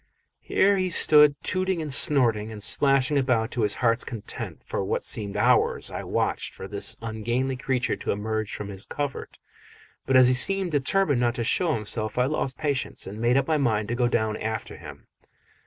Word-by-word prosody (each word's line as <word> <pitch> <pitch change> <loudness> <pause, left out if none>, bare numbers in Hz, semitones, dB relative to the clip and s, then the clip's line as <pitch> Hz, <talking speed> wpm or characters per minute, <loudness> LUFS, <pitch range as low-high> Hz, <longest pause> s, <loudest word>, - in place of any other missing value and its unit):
Here 200 +1 +2
he 185 -1 -1
stood 150 -3 +6
tooting 185 -1 -1
and 150 -3 -3
snorting 115 -7 +2
and 105 -2 -4
splashing 135 +2 +2
about 125 -4 0
to 120 - -3
his 105 -1 +2
heart's 115 -1 +1
content. 115 -4 -7
For - - -3
what - - -2
seemed 105 -2 -2
hours - - +1
I - - -5
watched - - -2
for 95 - -8
this 100 +1 -2
ungainly 120 +4 -2
creature 130 -1 -1
to - - -4
emerge 110 +1 -3
from 105 - -7
his 95 0 -4
covert, 145 -2 -5 0.7
but 135 - +1
as 130 -1 +7
he 130 - +3
seemed 190 +8 +3
determined 145 0 +1
not 120 -1 0
to 120 - -2
show 160 +6 +1
himself 110 0 -3
I 125 - +3
lost 135 -2 -2
patience 145 -3 -2
and 105 +3 -8
made 120 +2 +2
up 135 - 0
my 160 -1 +1
mind 110 -6 0
to 120 - -1
go 120 0 +1
down 110 -2 -1
after 110 0 -5
him. - - -12
125 Hz, 190 wpm, -25 LUFS, 110-145 Hz, 0.7 s, as